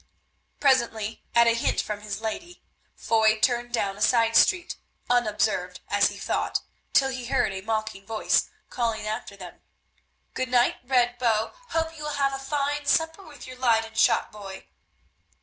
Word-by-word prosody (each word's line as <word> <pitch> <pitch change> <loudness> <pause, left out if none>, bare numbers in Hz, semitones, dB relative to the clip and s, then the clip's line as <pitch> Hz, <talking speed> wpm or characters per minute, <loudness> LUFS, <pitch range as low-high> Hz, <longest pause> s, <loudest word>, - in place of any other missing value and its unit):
Presently, 235 -5 +1
at 235 0 +7
a 230 - +4
hint 230 - 0
from 210 -1 -3
his 210 0 -5
lady, 345 +11 -6 0.3
Foy 220 -1 +2
turned 240 +1 +1
down 200 -5 -1
a - - -11
side 230 -1 +3
street, 360 +7 +3 0.4
unobserved, 210 -6 0
as 205 0 +3
he - - -9
thought, - - -1 0.3
till 270 -1 +4
he 255 -2 -5
heard 200 - +1
a 190 - -5
mocking 215 -1 -3
voice 225 -1 +1 0.2
calling 230 -3 -2
after 215 -2 -5
them, 180 -3 -11 0.7
"Good 255 0 -2
night, 245 -1 +3
Red 245 -1 +1
Bow, 225 -3 +1 0.2
hope 325 0 -1
you 300 -1 -7
will 300 - -3
have 275 -1 +1
a 270 - -4
fine 285 +1 -2
supper 325 +4 +1
with 305 -6 -12
your 255 0 -10
Leyden 225 -3 +2
shopboy." 205 -3 0
235 Hz, 160 wpm, -26 LUFS, 215-270 Hz, 0.7 s, at